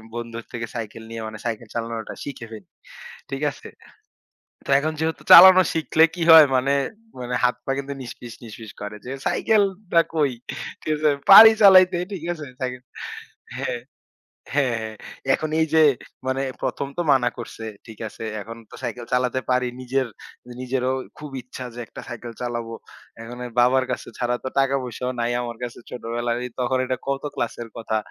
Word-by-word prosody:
বন্ধুর 115 -1 -6
থেকে 115 -1 -4
সাইকেল 110 -1 -6
নিয়ে 115 0 -6
মানে 110 -1 -8
সাইকেল 115 -1 -3
চালানোটা 115 -1 -4
শিখে 135 -5 -7
ফেলি। 105 -5 -10 0.6
ঠিক 135 +1 -4
আছে? - - -12 1.0
তো - - -4
এখন 155 +3 -1
যেহেতু 160 0 -2
চালানো 185 +1 +11
শিখলে 160 0 +3
কি 175 - -4
হয় 160 -2 +10
মানে 130 +2 +1 0.5
মানে 125 0 -4
হাত-পা 125 +1 0
কিন্তু 140 0 -5
নিসফিস, 120 -1 -9
নিসফিস 110 -1 -10
করে। 105 0 -6
যে - - -6 0.2
সাইকেলটা 200 -4 +2
কৈ, 150 -4 +2 0.5
ঠিক 155 - -1
আছে? 150 0 +2 0.2
পাড়ি 220 +3 +12
চালাইতে 185 -2 +8 0.2
ঠিক 175 -5 -6
আছে, 155 -3 -7 0.2
সাইকেল। 125 -1 -4 0.8
হ্যাঁ, 120 - -3 0.7
হ্যাঁ, 135 -4 +2
হ্যাঁ। 110 0 -6 0.4
এখন 155 - -1
এই - - +4
যে 160 - +6 0.5
মানে 130 +1 0 0.2
১ম 135 +2 -2
তো - - +1
মানা 125 -2 +2
করছে, 115 -1 -8 0.2
ঠিক 110 -1 -12
আছে। 110 - -10 0.2
এখন 115 +3 -9
তো - - -10
সাইকেল 120 0 -4
চালাতে 125 +1 +1
পারি। 125 0 +2
নিজের 130 +1 -1 0.5
নিজেরও 130 0 -1 0.3
খুব 150 0 -8
ইচ্ছা 125 +1 -9
যে - - -8
একটা - - -10
সাইকেল 120 0 -7
চালাবো। 120 -2 -4 0.5
এখন 120 +2 -9 0.2
বাবার 130 +2 +4
কাছে - - -4
ছাড়া 120 -1 0
তো - - -3
টাকা 135 0 +2
পয়সাও 125 +1 -4
নাই 120 +1 0
আমার 120 -1 -6
কাছে 120 -1 -6
ছোটবেলায়। 120 0 -3 0.2
তখন 125 +1 +1
এটা 130 0 -2
কত 140 0 -2
ক্লাসের 120 0 -4
কথা। 110 -1 -2
125 Hz, 165 wpm, -23 LUFS, 115-140 Hz, 1.0 s, পাড়ি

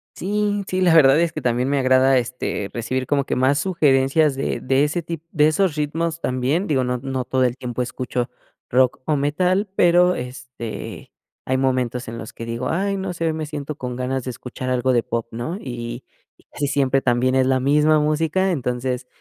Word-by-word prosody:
Sí, 205 +1 -1
sí, 185 0 -1
la 175 -3 +4
verdad 145 -1 +6
es 170 - +1
que 155 - -5
también 125 +1 0
me 140 -1 +1
agrada, 130 0 +4
este, 120 -4 -3
recibir 130 +2 -2
como 140 -1 +2
que - - -2
más 135 +3 +3
sugerencias 145 -4 +2
de 135 - -2
de 135 +2 +2
ese 155 +4 0
tip 165 -1 -6
de 150 -1 +4
esos 170 0 +1
ritmos. 165 +2 -2
También 130 +9 0
digo, 135 -4 +1
no 125 0 -1
no 130 0 -3
todo 130 0 +1
el 125 0 0
tiempo 125 -1 -4
escucho 125 0 -3 0.4
rock 125 0 +3
o 155 - +1
metal, 180 +8 +1
pero, 180 0 +4
este, 125 -2 -7 0.3
hay 130 0 0
momentos 125 -2 0
en 115 - -6
los 110 - -8
que 115 - -7
digo: 115 0 -3
"Ay, 195 +3 0
no 190 -1 -3
sé, 165 -1 -3
hoy 160 - +1
me 155 -1 -3
siento 150 0 -5
con 125 -2 -5
ganas 130 0 -2
de 130 - -3
escuchar 130 +1 -6
algo 130 0 +1
de 120 -2 +3
pop", 115 0 -3
¿no? 120 +10 -4
Y 120 - -6 0.3
y - - -26
casi 145 -1 -2
siempre 135 -1 +1
también 125 +1 +2
es 130 -1 +3
la 130 -1 +2
misma 150 +3 +3
música, 160 +5 +1
entonces, 125 -3 -2
135 Hz, 205 wpm, -21 LUFS, 125-155 Hz, 0.4 s, verdad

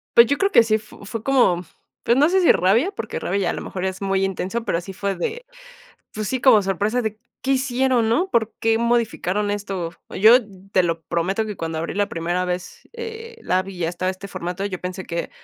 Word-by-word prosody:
Pues, 235 0 +8
yo 285 - +1
creo 395 0 +2
que 355 - +6
sí 220 -1 +2
f 215 0 -6
fue 215 +2 -6
como, 235 -10 +3 0.4
pues, 235 - +3
no 295 +3 +5
sé 380 +2 +3
si 355 - +6
rabia, 210 - +3
porque 225 - -5
rabia 195 - -1
ya, - - +1
a - - 0
lo - - -5
mejor 185 - -5
es 190 0 -3
muy 195 -1 +1
intenso, 195 +4 -2
pero, 170 - 0
sí 185 +2 -8
fue 200 +1 -2
de, 480 +1 -4 0.7
pues 215 -1 -4
sí, 260 +4 -1
como 245 -5 +6
sorpresa 200 +5 0
de, 220 -2 -3 0.3
¿qué 270 - +1
hicieron, 260 -3 +1
no? 340 +12 +2
¿Por 225 - +1
qué 225 0 +2
modificaron 225 -4 0
esto? 195 -5 -4 0.2
Yo 220 +5 +7 0.3
te 185 - +4
lo 165 -1 -1
prometo 190 +6 -1
que 210 -2 -5
cuando 165 -1 -4
abrí 165 - -3
la 205 +1 +1
primera 175 +2 -1
vez, 180 0 -5
eh, 460 0 -8
la 185 +1 +1
vi 195 0 -9
y - - -10
ya 165 - +1
estaba 180 +2 -2
este 190 +1 -8
formato, 180 0 -4
yo 185 -3 -5
pensé 185 +1 -5
que, 170 0 -4
205 Hz, 230 wpm, -22 LUFS, 185-240 Hz, 0.7 s, Pues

